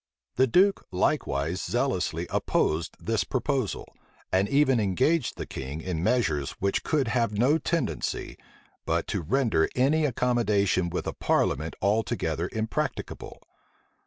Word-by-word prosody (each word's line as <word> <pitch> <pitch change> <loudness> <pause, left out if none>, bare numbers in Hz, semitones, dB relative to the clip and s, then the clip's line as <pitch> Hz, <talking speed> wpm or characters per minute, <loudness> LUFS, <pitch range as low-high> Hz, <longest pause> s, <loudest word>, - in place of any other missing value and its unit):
The 130 +1 +4
duke 195 - +3
likewise 80 -3 0
zealously - - -1
opposed 80 +2 0
this 115 -2 0
proposal, 130 -4 -2 0.4
and 95 +2 +2
even 135 -2 +3
engaged 125 - +1
the - - -4
king 70 +4 -6
in 80 -1 -3
measures 85 - +1
which 100 0 -1
could 140 -6 +1
have 115 -4 0
no 140 +8 +3
tendency, 170 0 -2 0.5
but - - 0
to - - -1
render 110 - +1
any 150 +5 +3
accommodation 110 -8 +1
with 90 - -3
a - - -3
parliament 80 +4 0
altogether 105 +3 0
impracticable. 110 0 -4
110 Hz, 125 wpm, -27 LUFS, 90-130 Hz, 0.5 s, The